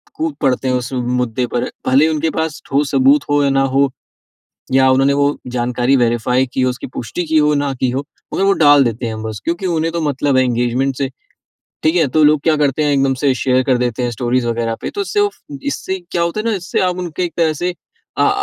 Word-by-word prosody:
कूद 160 -1 -2
पड़ते 130 -1 +1
हैं, 130 - +1
उस 125 +1 -3
मुद्दे 125 -1 -1
पर। 120 0 -2 0.2
भले 135 +4 +5
ही - - 0
उनके 155 +1 0
पास 160 -1 -3
ठोस 140 +1 0
सबूत 275 +2 +4
हो 145 0 +3
या 140 - +2
ना 135 0 +2 0.2
हो। 140 -1 +3 0.8
या 130 0 +5
उन्होंने 135 +1 +3
वो 145 +1 +1 0.2
जानकारी 125 +2 +1
वेरिफ़ाई 125 +2 +1
की - - -1
हो, 130 0 +2
उसकी 125 - -6
पुष्टि 125 +10 -4
की 160 0 -1
हो 150 0 +3
ना 145 -1 0
की 130 - +2
हो, 135 +3 -3 0.3
मगर 195 - +1
वो 195 - +4
डाल 145 -2 +6
देते 115 +1 -2
हैं 110 -1 -5
बस। 110 -2 -5
क्योंकि 170 +3 -2
उन्हें 165 -1 0
तो 170 - -2
मतलब 145 -1 0
है 130 - +4
इंगेजमेंट 125 +2 0
से, 135 -1 -1 0.7
ठीक 160 +1 +2
है? 160 -4 +3
तो 155 +4 +2
लोग 150 -1 +4
क्या 155 -2 +3
करते 145 0 +1
हैं 145 - +2
एकदम 135 -1 +2
से 140 -2 +3
शेयर 130 0 +2
कर 130 -2 +2
देते 125 0 -1
हैं 120 - 0
स्टोरीज़ 120 +1 -1
वगैरह 115 -1 -1
पे, - - -4
तो 410 - -5
उससे 410 +1 0
उफ़ 410 0 0 0.3
इससे 190 -9 -3
क्या 170 - 0
होता 170 +5 -1
है 225 - -4
ना, 225 - +1
इससे 175 0 -2
आप 180 -1 0
उनके 180 0 -3
एक 170 - -4
तरह 165 -2 +2
से, 175 +4 -3 0.4
आ - - +4
आ - - +4
140 Hz, 245 wpm, -17 LUFS, 125-160 Hz, 0.8 s, डाल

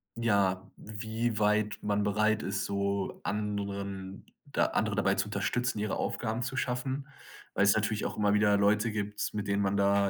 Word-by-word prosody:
ja, 100 -5 +1
wie 110 +1 -3
weit 105 0 +2
man 105 0 +1
bereit 110 +2 +2
ist, 100 +1 -1
so 100 -1 -1
anderen 100 -2 -3 0.3
da - - +3
andere - - 0
dabei - - +2
zu 95 - 0
unterstützen, 105 +4 -1
ihre 105 -1 -1
Aufgaben 110 +1 -2
zu 130 +2 -3
schaffen, 130 +2 -2 0.5
weil's 100 +1 +4
natürlich 105 0 0
auch - - -3
immer 105 -1 +3
wieder 105 -1 +4
Leute 105 +3 +3
gibt, 105 -1 -3
mit 105 -1 -2
denen 100 0 +1
man 100 0 +1
da 100 0 +3
105 Hz, 165 wpm, -30 LUFS, 100-110 Hz, 0.5 s, weil's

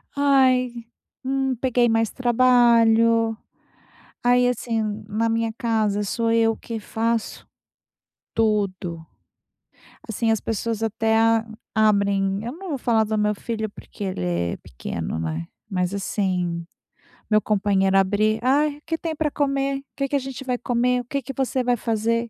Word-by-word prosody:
Ai, 260 -3 +3 0.5
hum, 265 0 0
peguei 245 0 +2
mais 225 -1 +2
trabalho. 230 -2 +4 0.9
Aí 245 0 +4
assim, 230 -2 -1 0.3
na 225 +2 0
minha 225 0 0
casa 215 -4 0
sou 230 +3 0
eu 225 -1 +3
que 225 -2 -6
faço 225 +1 -2 0.9
tudo. 190 -7 -1 1.0
Assim, 225 +1 0
as 220 - +1
pessoas 225 0 -2
até 225 0 +1
a 225 0 +3 0.3
abrem 200 -2 +2
eu 240 - -4
não 370 +2 -9
vou 285 - -2
falar 230 -3 +2
do 215 0 -2
meu 210 0 +1
filho 220 0 -4
porque 205 - -10
ele 185 - -3
é 85 -1 -1
pequeno, 80 +6 -5
né. 80 +1 -3 0.2
Mas, 180 0 -1
assim, 180 -4 -1 0.6
meu 215 0 +4
companheiro 195 -2 +2
abre: 210 +3 +2
"Ai, 285 +3 +2
o 295 - -20
que 325 0 -2
tem 320 -1 -4
para 300 -1 -1
comer? 275 -1 0
O - - -16
que 275 0 -1
que 285 - -1
a - - +3
gente 270 0 -7
vai 250 -1 -1
comer? 245 +1 +1
O - - -13
que 275 +3 -3
que 270 +2 -7
você 260 -1 0
vai 245 0 +1
fazer?" 230 +1 -1
225 Hz, 155 wpm, -23 LUFS, 210-250 Hz, 1.0 s, trabalho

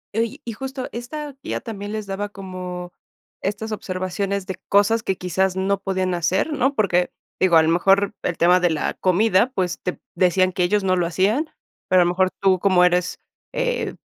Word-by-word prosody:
Oye, 225 0 -1
y 230 - -4
justo 265 +2 -5
esta 280 +4 -6
guía - - -3
también 205 -3 -7
les 215 -1 -4
daba 200 +1 -4
como 180 -3 -7 0.5
estas 210 +3 -3
observaciones 195 0 -3
de 185 -1 -5
cosas 205 +3 +4
que 190 -4 -2
quizás 185 +1 0
no 195 +1 0
podían 185 -2 -1
hacer, 180 - 0
¿no? 280 0 +1
Porque, 180 -5 +2 0.3
digo, 185 -3 +4
a 160 - +6
lo 160 - +2
mejor 195 +4 +3
el 175 - -2
tema 180 +2 +5
de 175 - +2
la 160 -2 -1
comida, 200 +5 +2
pues, 180 -2 -1
te 180 - -4 0.2
decían 185 0 +3
que 180 0 0
ellos 205 +3 +2
no 185 -1 +2
lo 175 -2 +1
hacían, 210 - +1 0.4
pero 185 -1 +6
a - - 0
lo 175 - +2
mejor 185 +1 +2
tú 190 -2 +3
como 185 -2 +4
eres 180 0 +1 0.4
e - - -1
190 Hz, 190 wpm, -22 LUFS, 180-215 Hz, 0.5 s, a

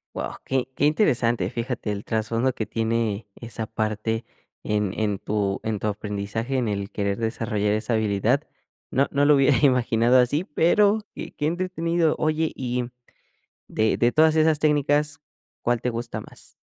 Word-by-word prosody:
Wao, - - -5
qué 130 -1 -1
qué 145 - +1
interesante, 120 - +1
fíjate, 115 -2 -3
el 100 0 -4
trasfondo 115 +3 0
que 110 - -3
tiene 110 -1 -1
esa 115 -1 -6
parte 110 +1 -2 0.4
en 105 -2 0
en 105 -3 0
tu 100 -2 -1
en 110 -1 -1
tu - - -5
aprendizaje, 105 +4 -3
en 125 -3 0
el 100 -1 -2
querer 100 0 -2
desarrollar 110 -2 -1
esa 110 +2 -1
habilidad, 110 +4 +1 0.5
no 140 +2 +2
no 145 0 +2
lo 150 0 +6
hubiera 135 -1 +4
imaginado 125 -3 +3
así, 130 +6 +2
pero 200 +7 +3 0.2
qué - - -7
qué 150 - -3
entretenido, 170 -1 0
oye 155 +1 0
y, 125 -1 -2
mm, 120 - -7 0.8
de 110 0 +1
de 120 0 +2
todas 155 0 +4
esas 155 -1 +3
técnicas, 150 +1 +1 0.4
¿cuál 120 -1 +1
te 125 - -1
gusta 115 0 -4
más? - - -13
120 Hz, 160 wpm, -24 LUFS, 110-145 Hz, 0.8 s, lo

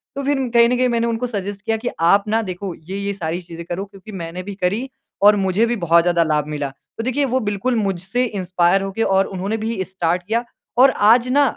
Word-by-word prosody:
तो 280 - -3
फिर 285 0 +1 0.2
कहीं 235 0 +6
ना 250 - +2
कहीं 255 0 +2
मैंने 235 -1 +1
उनको 230 +2 -1
सजेस्ट 200 -3 -4
किया 225 0 +1
कि 245 +2 -3
आप 200 +5 +4
ना 220 +2 +1
देखो, 185 -2 -5
"ये, 185 +5 -7
ये 200 0 -2
सारी 175 -2 -3
चीज़ें 170 -1 -9
करो 175 +4 -4
क्योंकि 200 +1 -13
मैंने 180 -1 -6
भी 200 +1 -7
करी 205 +8 -1 0.3
और 205 +1 +7
मुझे 190 +5 +2
भी 240 +1 0
बहुत 170 0 +5
ज़्यादा 175 -1 +3
लाभ 150 -2 0
मिला।" 145 -2 -3 0.3
तो 225 - -3
देखिए, 260 +4 0
वो 260 0 0
बिल्कुल 210 +2 -1
मुझसे 195 +3 -1
इंस्पायर 185 -3 +1
होके 195 +3 -3
और 195 -1 +3
उन्होंने 195 +4 -3
भी 225 -5 -2
स्टार्ट 180 -1 -1
किया 230 +2 0 0.3
और 260 +2 +7 0.2
आज 245 +1 +4
ना 285 +2 +5
200 Hz, 230 wpm, -20 LUFS, 180-230 Hz, 0.3 s, और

